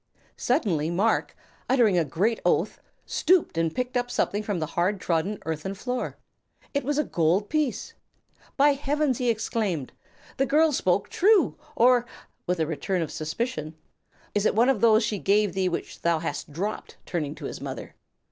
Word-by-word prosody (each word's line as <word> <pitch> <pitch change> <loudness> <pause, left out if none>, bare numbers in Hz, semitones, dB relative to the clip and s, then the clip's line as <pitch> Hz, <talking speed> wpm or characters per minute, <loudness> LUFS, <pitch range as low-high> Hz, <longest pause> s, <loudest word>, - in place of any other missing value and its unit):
Suddenly 190 - +1
Marc, 195 +7 +1 0.3
uttering 240 -7 +4
a 170 - +3
great 190 - 0
oath, - - +1 0.3
stooped 365 - +2
and 165 -1 0
picked 250 0 -2
up 245 0 0
something 205 -3 0
from 205 -3 -2
the 160 - -1
hard 185 +6 0
trodden 180 +4 -1
earthen 160 +5 -3
floor. 250 +5 -4 0.6
It 280 - 0
was 290 +2 -1
a 300 - +3
gold 175 - +1
piece! 305 -5 -1 0.6
"By 285 +1 +6
Heavens!" 285 -1 0
he 250 -2 +1
exclaimed, 215 - -1 0.5
"the 270 - +1
girl 310 +2 +4
spoke 195 -7 +1
true! 400 -2 +4 0.2
or" 245 0 +4 0.4
with 180 -1 0
a 160 - +2
return 170 +3 -1
of 155 - -6
suspicion 155 - -3 0.6
"is 205 0 +2
it - - 0
one 235 +4 +4
of 245 -7 +1
those 220 -1 +5
she 210 - -1
gave 205 -1 +2
thee 190 -1 +1
which 170 - -5
thou 170 -1 +2
hast 155 -2 -4
dropped?" 195 +8 -4
turning 155 -4 -3
to - - -8
his - - -6
mother. - - -6
205 Hz, 170 wpm, -26 LUFS, 170-250 Hz, 0.6 s, By